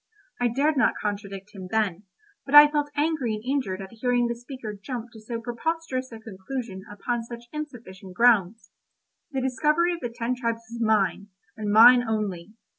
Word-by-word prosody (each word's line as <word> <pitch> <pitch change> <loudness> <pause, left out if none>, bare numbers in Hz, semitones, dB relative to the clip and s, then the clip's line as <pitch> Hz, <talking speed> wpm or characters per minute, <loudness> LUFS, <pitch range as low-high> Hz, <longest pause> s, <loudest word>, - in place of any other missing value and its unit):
I 245 - +2
dared 280 +6 +1
not 250 - +3
contradict 200 -1 -5
him 190 -2 -8
then, 205 -3 -1 0.4
but 280 - -1
I 295 0 +10
felt 295 -1 0
angry 290 -7 0
and 215 - -8
injured 250 -9 -2
at 190 - -11
hearing 245 +1 +1
the 235 - -1
speaker 240 -2 -8
jump 235 +3 -7
to 220 - -11
so 230 +2 -5
preposterous 260 +2 -3
a 225 - -9
conclusion 215 -1 -7
upon 235 +3 -3
such 235 +1 -9
insufficient 220 -11 -8
grounds. 225 -2 +3 0.6
The 270 -4 -2
discovery 300 +7 +2
of 340 - -5
the 240 - -4
ten 235 +1 -2
tribes 230 -2 -2
was 235 0 -6
mine, 205 -3 +1 0.3
and 210 -2 -3
mine 240 +4 +8
only. 210 -5 -3
235 Hz, 175 wpm, -25 LUFS, 210-260 Hz, 0.6 s, I